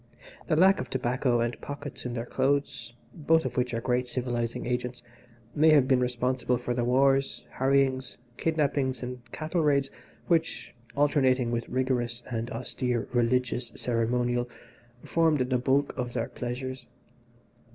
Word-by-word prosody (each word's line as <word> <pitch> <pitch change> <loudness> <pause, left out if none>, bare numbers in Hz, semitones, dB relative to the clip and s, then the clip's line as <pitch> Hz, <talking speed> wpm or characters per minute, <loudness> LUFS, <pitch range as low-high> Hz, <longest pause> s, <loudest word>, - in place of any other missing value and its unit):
The 155 - +2
lack 190 +4 +5
of - - -5
tobacco 125 -1 +1
and 120 +1 -2
pockets 145 -2 -6
in 120 - -5
their 115 -1 -3
clothes 130 -3 -1 0.2
(both 160 +1 +2
of - - -3
which 125 -1 0
are 115 - -1
great 125 0 0
civilising 120 -2 -2
agents) 125 0 -3 0.5
may 155 +2 +5
have 145 -4 +5
been 130 -2 +4
responsible 125 0 0
for 120 0 -3
the 120 0 0
wars, 135 +2 +2 0.2
harryings, 130 -1 +1 0.2
kidnappings 140 -5 0
and 125 0 -6
cattle 160 +2 -2
raids 140 -3 +2 0.3
which, 165 -2 0 0.2
alternating 135 -4 +2
with 115 -1 -2
rigorous 125 -2 -1
and 115 0 -2
austere 125 0 -2
religious 125 0 +1
ceremonial, 120 +1 0 0.5
formed 160 -4 +2
the 125 -1 +1
bulk 135 +3 +1
of 125 -2 -3
their - - -2
pleasures. 125 +1 -5
125 Hz, 140 wpm, -28 LUFS, 120-140 Hz, 0.5 s, lack